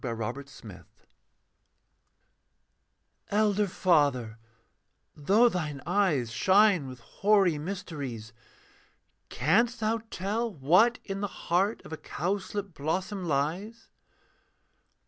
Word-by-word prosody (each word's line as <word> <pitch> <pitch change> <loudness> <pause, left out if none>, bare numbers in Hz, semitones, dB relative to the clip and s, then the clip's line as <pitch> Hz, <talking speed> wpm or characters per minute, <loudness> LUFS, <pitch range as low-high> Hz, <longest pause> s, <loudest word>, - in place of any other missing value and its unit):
THE 120 -3 -3
HOLY 110 -1 -3 0.2
OF 140 -1 -15
HOLIES 105 -6 -11 2.5
'Elder 210 0 +2
father, 140 - +1 0.8
though 200 +11 +4
thine 155 -9 -3
eyes 170 - +1
Shine 190 - +3
with 130 -2 -10
hoary 195 - +2
mysteries, 145 - -6 1.0
Canst 240 0 +1
thou 225 +1 0
tell 215 +5 -2
what 180 - +4
in 195 -1 -5
the 205 - -1
heart 190 +3 -1
Of - - -9
a - - -4
cowslip 195 +3 -4
blossom 180 +6 -3
lies? 175 +11 -2
180 Hz, 100 wpm, -28 LUFS, 140-205 Hz, 2.5 s, though